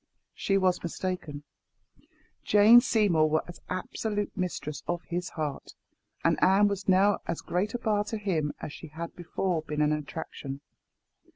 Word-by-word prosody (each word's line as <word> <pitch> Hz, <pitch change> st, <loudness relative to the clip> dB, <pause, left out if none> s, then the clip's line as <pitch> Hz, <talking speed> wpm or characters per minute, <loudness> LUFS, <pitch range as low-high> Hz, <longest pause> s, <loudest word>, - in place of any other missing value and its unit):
She 195 Hz, -, +1 dB
was 185 Hz, -2 st, +2 dB
mistaken. 170 Hz, -4 st, -4 dB, 1.0 s
Jane 215 Hz, +4 st, +7 dB
Seymour 200 Hz, -11 st, +3 dB
was 155 Hz, +3 st, -2 dB
absolute 205 Hz, +3 st, -3 dB
mistress 170 Hz, -6 st, -3 dB
of 175 Hz, 0 st, -2 dB
his 175 Hz, 0 st, -3 dB
heart; 150 Hz, -4 st, -5 dB, 0.5 s
and -, -, +2 dB
Anne 195 Hz, +2 st, +5 dB
was 200 Hz, -1 st, -3 dB
now 195 Hz, +2 st, +4 dB
as 170 Hz, -, -2 dB
great 200 Hz, +6 st, -1 dB
a -, -, +1 dB
bar 215 Hz, -3 st, +1 dB
to 220 Hz, -, -3 dB
him 170 Hz, -8 st, -1 dB
as 145 Hz, -, -6 dB
she 165 Hz, -, -9 dB
had 165 Hz, +3 st, -7 dB
before 175 Hz, 0 st, -2 dB
been 150 Hz, -1 st, -1 dB
an 150 Hz, -, +2 dB
attraction. 145 Hz, -2 st, -6 dB
180 Hz, 150 wpm, -28 LUFS, 155-205 Hz, 1.0 s, Jane